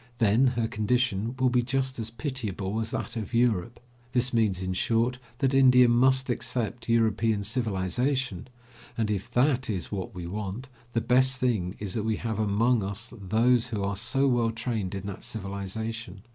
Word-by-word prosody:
Then 115 +4 +4
her 115 -1 +1
condition 115 0 0
will 130 -1 +2
be 125 0 +3
just 130 +1 -1
as 115 0 -2
pitiable 110 - -3
as 110 0 -2
that - - -4
of 115 +1 -4
Europe. 115 -2 +1 0.3
This 125 0 +1
means, 110 -5 +2
in 95 0 -2
short, 115 +5 +1 0.2
that 135 +1 +1
India 125 -2 +6
must 130 +2 +4
accept 120 -1 -3
European 110 -2 +2
civilization, 115 +1 -1 0.5
and 110 -2 0
if 100 -2 -3
that 130 0 +2
is 95 -4 -3
what 95 -2 -4
we 90 -1 -6
want, 105 +7 -5 0.2
the 115 - +1
best 130 +3 +3
thing 105 -8 0
is 100 -3 -4
that 110 - -1
we 110 +1 0
have 110 0 -3
among 110 +3 +2
us 100 +5 -4
those 115 +4 +2
who 110 -4 -3
are 100 0 -1
so 135 +7 +1
well 120 -3 +2
trained 115 -4 -3
in 95 0 -5
that 100 -1 -6
civilization. 100 0 -5
115 Hz, 175 wpm, -27 LUFS, 100-125 Hz, 0.5 s, India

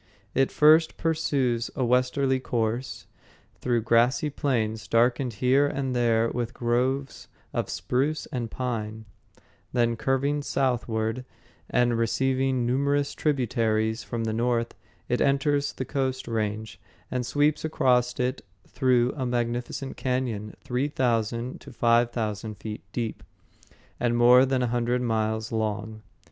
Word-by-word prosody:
It 135 0 +2
first 155 +2 +5
pursues 135 -7 0
a 130 - 0
westerly 130 +2 +2
course 120 0 -2 0.5
through 120 -3 0
grassy 120 +6 +3
plains 110 -6 -1
darkened 120 +2 +2
here 130 +6 +3
and 135 -2 -2
there 115 -1 +2
with 120 0 -3
groves 130 +3 -1 0.3
of - - -2
spruce 130 - -1
and 120 -3 -3
pine; 110 -3 -4 0.7
then, 120 -1 +2
curving 135 +5 0
southward 120 -4 -1 0.5
and 120 -2 +2
receiving 130 +2 +1
numerous 140 +3 +1
tributaries 115 -6 0
from 115 -1 -4
the 110 -1 -1
north, 115 0 0 0.3
it 125 - 0
enters 140 +1 +2
the 130 - -5
Coast 130 -1 -2
Range, 110 -4 -3 0.3
and 125 -1 -1
sweeps 145 +5 +1
across 125 -5 +1
it 125 +1 -1 0.3
through 125 -1 +2
a 130 -3 -2
magnificent 120 +3 -3
cañon 125 -5 -2
three 125 +3 -1
thousand 120 -3 -1
to - - -11
five 120 0 +3
thousand 110 -2 -4
feet 105 0 -6
deep, 115 -1 -3 0.8
and 120 -1 +1
more 125 +2 +7
than 130 -1 +1
a - - +1
hundred 120 +1 0
miles 110 -1 -1
long. 110 0 -3
125 Hz, 130 wpm, -26 LUFS, 115-130 Hz, 0.8 s, more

